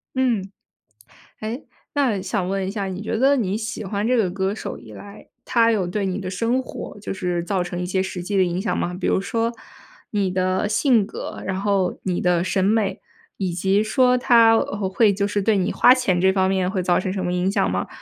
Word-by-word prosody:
嗯。 235 -7 0 0.9
诶， 225 +6 -5 0.3
那 250 -9 +1
想 190 -5 -2
问 195 -1 -1
一 190 - -3
下， 200 -2 -3
你 190 +1 -5
觉 220 +1 -2
得 275 +3 +4
你 205 -4 -1
喜 220 -1 -5
欢 200 +2 -2
这 250 - +2
个 210 -6 +2
歌 190 +2 -1
手 - - -6
以 115 -2 -13
来， 200 - -12 0.2
他 230 -1 +3
有 200 -5 +1
对 195 +2 -2
你 190 +1 -2
的 185 -2 -5
生 235 +7 0
活 205 - -8
就 200 - -5
是 180 -3 -2
造 190 -1 0
成 175 0 -5
一 180 - -2
些 190 +1 0
实 190 -2 -5
际 200 +2 -3
的 190 - +5
影 180 0 -1
响 215 - -1
吗？ 175 - -2
比 - - -2
如 - - +2
说 230 +4 -1 0.6
你 200 -3 0
的 185 +2 0
性 220 -1 +3
格， - - -7
然 190 -1 -2
后 200 -2 0
你 180 -2 -1
的 180 -1 +2
审 185 +1 0
美， 215 +1 +1 0.4
以 185 -3 -2
及 195 +4 +1
说 250 +3 +3
他 230 -2 +5
呃， 200 -3 -1
会 205 +2 +3
就 200 +1 0
是 205 0 -1
对 215 +1 +2
你 185 - 0
花 250 - +6
钱 190 -9 0
这 190 0 +4
方 190 -1 +2
面 190 -1 0
会 190 -2 -1
造 175 0 +2
成 185 0 -2
什 190 -2 -3
么 180 - -1
影 180 +1 +1
响 95 - +1
吗？ 95 +1 -1
195 Hz, 245 characters per minute, -22 LUFS, 185-220 Hz, 0.9 s, 花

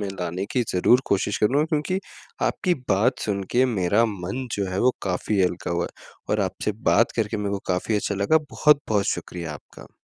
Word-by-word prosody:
में 100 - -2
लाने 90 +2 -2
की 125 - +2
ज़रूर 105 +7 +4
कोशिश 100 +1 0
करूँगा, 135 +8 +3
क्योंकि 160 +3 -1 0.5
आपकी 180 -3 +1 0.2
बात 105 +7 +3
सुन 100 -2 -1
के 125 +2 +4
मेरा 105 -1 +2
मन 100 +5 -4
जो 100 -1 -1
है, 95 - -2
वो 125 +1 +4
काफ़ी 95 +2 0
हल्का 90 -1 -1
हुआ 85 0 0
है - - -10 0.3
और - - +2
आपसे 105 - -1 0.2
बात 115 - +4
करके 110 -1 0
मेरे 100 -1 -2
को - - -2
काफ़ी 90 +5 -1
अच्छा 100 0 -1
लगा। 100 +11 +3
बहुत-बहुत 140 -9 +3
शुक्रिया 85 -3 -6
आपका। - - -14
105 Hz, 190 wpm, -24 LUFS, 95-125 Hz, 0.5 s, ज़रूर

